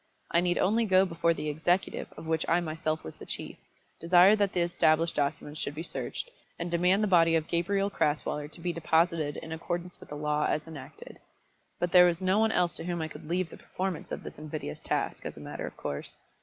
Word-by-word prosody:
I 170 - +4
need 175 0 +1
only 225 +4 +2
go 190 -2 +5
before 170 -2 +1
the 155 - -4
executive 165 +5 0
of - - -8
which 160 -1 0
I 170 - +4
myself 155 -1 -2
was 80 - -9
the - - -10
chief, - - -5 0.4
desire 180 +4 +6
that 200 -2 +1
the 180 - +1
established 165 -1 +2
documents 145 +1 -2
should 145 - -3
be 160 - -4
searched, - - -5 0.3
and 170 0 -4
demand 180 +4 +3
the - - +2
body 165 -3 +5
of 160 -1 +1
Gabriel 195 +4 0
Crasweller 150 -2 0
to 170 - -12
be 175 0 -1
deposited 160 -2 +1
in 160 - -8
accordance 175 +2 -4
with - - -14
the 150 - -6
law 150 0 0
as 150 - -1
enacted. 155 -5 -11 0.6
But 175 0 0
there 180 -1 +8
was 170 -1 0
no 190 +2 +2
one 220 0 +3
else 180 -3 +1
to - - -4
whom 175 -1 -2
I 160 0 -3
could 150 - -11
leave 180 0 0
the - - -10
performance 185 -3 -4
of - - -4
this - - -9
invidious 150 - -6
task, - - -2
as - - -6
a - - -8
matter - - -6
of - - -10
course. 70 0 -5
170 Hz, 225 wpm, -29 LUFS, 155-180 Hz, 0.6 s, there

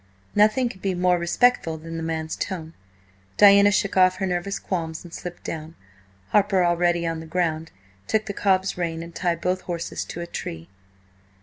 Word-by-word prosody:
Nothing 215 +5 +4
could 190 -5 -9
be 190 -2 -1
more 180 0 +2
respectful 170 -1 +2
than 165 +1 -8
the - - -4
man's 160 -1 -3
tone. 165 -4 -5 0.6
Diana 200 0 +8
shook 200 0 0
off 185 -1 +5
her 190 +1 -2
nervous 185 +2 -2
qualms 165 -4 -4
and 175 -1 -12
slipped 175 -1 -7
down. 160 0 -6 0.5
Harper, 200 -3 +3
already 175 0 +2
on 165 -1 -2
the 160 - -9
ground, 165 -1 -1 0.4
took 215 0 +1
the 200 - -4
cob's 190 -1 +1
rein 165 -1 -2
and 170 0 -11
tied 170 -2 -1
both 185 +1 0
horses 170 -2 -4
to - - -7
a - - -4
tree. 80 - -7
175 Hz, 180 wpm, -24 LUFS, 165-195 Hz, 0.6 s, Diana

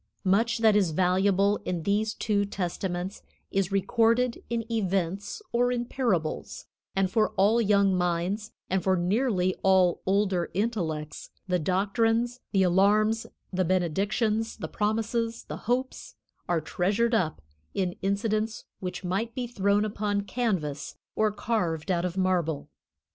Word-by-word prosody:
Much 220 +5 +3
that 220 -2 +4
is 200 -4 +3
valuable 190 +4 +2
in 175 -3 -3
these 210 +3 0
two 205 -2 +1
testaments 185 -1 -3 0.3
is 195 -1 0
recorded 230 +4 +2
in 230 -1 -1
events 195 - -1
or 245 +1 +2
in 240 -1 -1
parables, 205 -12 -2 0.3
and 195 -1 +1
for 220 -2 +3
all 215 +5 +4
young 200 -3 +3
minds 180 +5 -1 0.2
and 190 0 0
for 190 -1 +3
nearly 185 0 +1
all 185 -2 +4
older 190 -3 +1
intellects, 170 -8 -2 0.2
the 180 -1 +1
doctrines, 225 +7 +1
the 195 -2 +3
alarms, 210 +5 +3 0.3
the 185 +1 +2
benedictions, 200 +6 0
the - - -5
promises, 225 +2 -1
the - - -7
hopes 255 +2 -2 0.3
are 170 -2 +2
treasured 200 +9 0
up 180 -8 +1 0.4
in 185 -2 -1
incidents 215 +2 -1
which 185 0 -5
might 200 +6 -2
be 250 - -2
thrown 205 -3 +1
upon 205 -1 -1
canvas 190 - -2 0.2
or 215 -1 +2
carved 195 -6 -1
out 175 0 +1
of 180 +1 -3
marble. 175 -5 0
200 Hz, 135 wpm, -27 LUFS, 180-225 Hz, 0.4 s, that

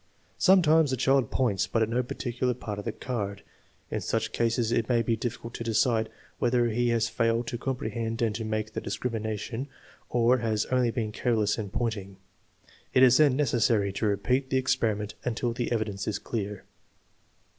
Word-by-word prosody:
Sometimes 165 -5 +5
the 130 - 0
child 135 -1 +2
points, 115 -7 +1
but 115 - +1
at 110 - -1
no 120 +2 +1
particular 125 0 -2
part 105 -2 -5
of 105 - -7
the 115 - -1
card. 105 -5 -4 0.5
In - - -2
such - - -1
cases 115 0 0
it 115 -1 0
may 120 -2 +3
be 115 - +1
difficult 115 0 -5
to - - -5
decide 115 -1 +1 0.3
whether 120 -1 +2
he 120 +2 +1
has 115 -1 +2
failed 115 0 +1
to 120 0 -4
comprehend 115 -3 -3
and 115 -3 +1
to 110 +2 -4
make 110 0 -3
the - - -3
discrimination 115 +2 -3 0.4
or 120 +1 +3
has 110 -2 0
only 125 -2 +3
been 115 -2 -2
careless 110 -2 0
in 105 -2 -4
pointing. 100 -4 -3 0.8
It 130 - +7
is 130 -1 +7
then 145 -4 +5
necessary 115 -7 +2
to 110 - -1
repeat 125 +7 0
the 130 - +2
experiment 110 -5 0
until 120 0 -1
the 120 0 -3
evidence 105 -4 -2
is 105 - 0
clear. 105 -3 -4
115 Hz, 175 wpm, -28 LUFS, 110-125 Hz, 0.8 s, It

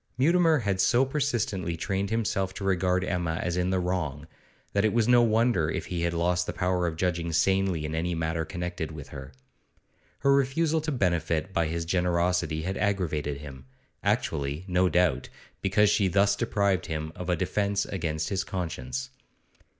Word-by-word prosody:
Mutimer 165 +3 +4
had 100 -3 0
so 125 +5 +4
persistently 115 - -1
trained 95 +3 -2
himself 100 -4 -1
to 100 - -6
regard 90 -1 +1
Emma 90 -3 -1
as 85 +1 -2
in 90 0 0
the 95 - +1
wrong, 80 -5 -2 0.5
that 100 - +2
it 110 - +2
was 115 -1 +2
no 120 -1 +6
wonder 110 -7 +2
if - - -3
he 90 -2 -3
had 85 0 0
lost 90 +1 +1
the - - -3
power 90 -1 0
of 80 - -3
judging 85 -1 -1
sanely 95 0 +1
in 75 - -4
any 85 +2 -1
matter 80 0 -1
connected 90 -1 -4
with 75 -2 -9
her. 70 -2 -9 0.9
Her 140 - +4
refusal 150 +4 +2
to 155 0 -2
benefit 85 - 0
by 85 -3 +1
his 85 +1 -3
generosity 90 -2 0
had 95 +2 -3
aggravated 80 -8 -1
him; 65 -3 -10 0.4
actually, 70 +5 -1
no 90 0 +2
doubt, 90 -8 +1 0.3
because 100 +2 +3
she 100 -2 +3
thus 100 +2 +3
deprived 100 -6 0
him 80 0 -3
of 90 0 -6
a 90 - +3
defence 100 +3 0
against 80 -4 -2
his 95 -1 -1
conscience. 65 -10 -4
90 Hz, 175 wpm, -27 LUFS, 80-100 Hz, 0.9 s, no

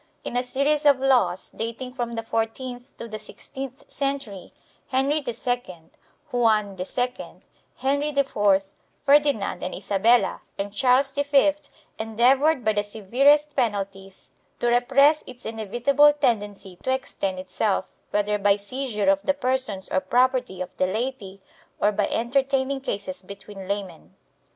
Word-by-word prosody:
In - - -5
a 245 - +3
series 280 +4 +1
of 280 -2 +5
laws, 245 -10 +2
dating 230 +3 -5
from 240 -2 -3
the 225 - -3
fourteenth 245 +3 -3
to 235 - -7
the 215 -1 -6
sixteenth 265 +5 -8
century, 275 -9 -4 0.4
Henry 270 +4 +1
II, 240 -6 -3 0.5
Juan 215 -5 +2
II, 245 +7 -4 0.3
Henry 280 +3 0
IV, 205 -9 +2 0.4
Ferdinand 285 -7 +3
and 185 - -4
Isabella 205 +5 +2 0.2
and 200 0 -4
Charles 265 +3 +3
V 285 +1 +3 0.5
endeavored 250 +6 +3
by 215 - +3
the 205 - +1
severest 265 +9 +2
penalties 195 -5 -3 0.3
to 240 - +1
repress 270 +5 +4
its 250 -1 -11
inevitable 240 +7 +3
tendency 205 -8 -1
to 260 - -1
extend 260 -8 -2
itself, 190 +1 -1 0.2
whether 210 0 0
by 200 0 +4
seizure 210 0 -3
of 195 0 +1
the 280 +8 0
persons 255 -8 -1
or 185 - +3
property 245 0 +1
of 185 0 -6
the 185 - +2
laity 205 -2 -4 0.4
or 210 - +3
by 205 -1 0
entertaining 270 +2 0
cases 200 -8 -4
between 195 0 -10
laymen. 190 - -5
240 Hz, 135 wpm, -24 LUFS, 200-270 Hz, 0.5 s, of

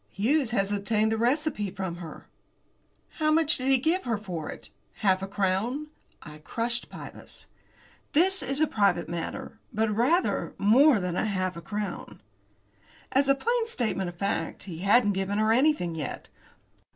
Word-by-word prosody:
Hughes 260 +6 +1
has 200 -4 0
obtained 210 +2 +1
the 225 - 0
receipt 240 - 0
from 190 -3 -4
her." 165 -3 -9 0.9
"How 310 -1 +2
much 315 0 +3
did 255 - -3
he 270 0 +5
give 325 +8 0
her 230 -3 0
for 180 -7 -6
it? 110 -2 -9 0.3
Half 190 -1 +4
a 195 - -3
crown?" 205 +9 -1 0.3
I 150 0 -11
crushed 235 +9 -3
Pybus. - - -10 0.7
"That 375 +5 +4
is 275 +2 -1
a 310 - +5
private 200 - +1
matter, 170 +6 -5
but 215 0 0
rather 285 - +1
more 235 +6 +5
than 180 -2 -2
half 185 -2 -1
a 170 - -7
crown." 210 +3 -5 0.9
As 275 +1 +2
a 275 - +6
plain 465 - 0
statement 220 - -1
of 175 - -11
fact 175 -3 -2
he 175 -4 -7
hadn't 205 +3 +4
given 195 +1 -1
her 215 +1 +3
anything 255 - +2
as 165 - -6
yet. 150 - -6
215 Hz, 165 wpm, -27 LUFS, 190-270 Hz, 0.9 s, a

